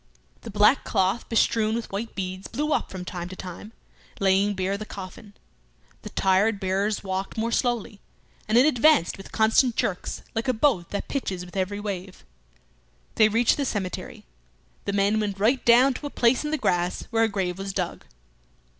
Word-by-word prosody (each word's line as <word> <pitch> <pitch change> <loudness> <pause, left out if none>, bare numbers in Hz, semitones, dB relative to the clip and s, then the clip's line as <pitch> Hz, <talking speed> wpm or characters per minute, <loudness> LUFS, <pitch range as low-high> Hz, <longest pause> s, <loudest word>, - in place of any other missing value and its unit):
The - - -8
black 210 +5 +4
cloth 190 +5 0
bestrewn 225 -1 +2
with 235 - -5
white 210 +4 -4
beads 185 0 -4
blew 300 +2 -1
up - - -1
from 185 -1 -7
time 175 -2 -5
to 185 - -8
time, 185 +4 -9 0.5
laying 195 +1 +2
bare 190 +1 -1
the 210 - -5
coffin. 200 +1 -10 0.7
The - - -8
tired 195 +2 +2
bearers 195 +2 -1
walked 190 +1 -4
more 230 +1 -1
slowly, 235 -5 -1 0.5
and 215 +2 +3
it 250 - +7
advanced 300 - +4
with 195 - -12
constant 225 +2 +3
jerks, 180 -3 -2
like 225 +3 -2
a 255 - +3
boat 225 - +1
that 200 - -4
pitches 190 -10 -3
with 180 - -14
every 195 +2 -1
wave. 195 -2 -6 0.9
They 215 -1 +5
reached 230 +2 +3
the 285 - 0
cemetery. 195 -7 -4 0.6
The 200 - -2
men 200 +2 +2
went 200 -2 -2
right 240 +6 +2
down 250 +3 +6
to 290 - -6
a - - -6
place 240 0 +2
in 300 - -2
the 310 - 0
grass 175 -7 0
where 225 0 +3
a - - -1
grave 190 -3 -2
was 195 0 -4
dug. - - -3
205 Hz, 180 wpm, -25 LUFS, 190-230 Hz, 0.9 s, it